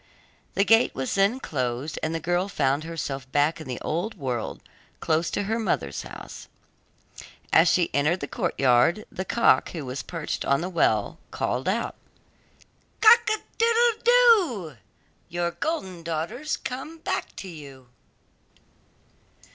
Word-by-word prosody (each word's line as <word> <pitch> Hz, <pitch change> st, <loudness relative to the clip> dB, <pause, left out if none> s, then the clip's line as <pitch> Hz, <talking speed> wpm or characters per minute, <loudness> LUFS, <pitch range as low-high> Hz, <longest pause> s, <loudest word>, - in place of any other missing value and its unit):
The 200 Hz, -, +3 dB
gate 225 Hz, +1 st, +4 dB
was 135 Hz, -1 st, -2 dB
then 200 Hz, +6 st, +2 dB
closed, 130 Hz, -, -3 dB
and 160 Hz, +1 st, -2 dB
the -, -, -1 dB
girl 175 Hz, +4 st, 0 dB
found 145 Hz, -3 st, 0 dB
herself 140 Hz, -5 st, -5 dB
back 150 Hz, +4 st, +1 dB
in 155 Hz, -, -9 dB
the 125 Hz, -, -4 dB
old 175 Hz, +8 st, -2 dB
world 125 Hz, -6 st, -4 dB, 0.4 s
close 160 Hz, +1 st, +1 dB
to -, -, -2 dB
her 220 Hz, +3 st, -1 dB
mother's 75 Hz, -, -1 dB
house. -, -, -10 dB, 1.1 s
As 165 Hz, +3 st, +6 dB
she 175 Hz, 0 st, +2 dB
entered 150 Hz, +6 st, +2 dB
the 145 Hz, -, -5 dB
courtyard, 135 Hz, -, +2 dB
the 190 Hz, -, -5 dB
cock 235 Hz, -, +3 dB
who 160 Hz, -5 st, -5 dB
was 130 Hz, +1 st, -4 dB
perched 165 Hz, -3 st, -4 dB
on 140 Hz, +1 st, +1 dB
the 180 Hz, -, -3 dB
well, 110 Hz, -, +1 dB
called 125 Hz, +7 st, -2 dB
out: 230 Hz, +4 st, -1 dB, 1.1 s
'Cock 450 Hz, 0 st, +7 dB
a 435 Hz, -, +1 dB, 0.2 s
doodle 465 Hz, 0 st, +3 dB
doo! 390 Hz, -, +4 dB, 0.5 s
Your 175 Hz, 0 st, -1 dB
golden 190 Hz, -, -3 dB
daughter's 170 Hz, -, -3 dB
come 270 Hz, +6 st, -6 dB
back 320 Hz, -, -3 dB
to 195 Hz, -, -8 dB
you. 140 Hz, -7 st, -11 dB
170 Hz, 140 wpm, -25 LUFS, 140-225 Hz, 1.1 s, Cock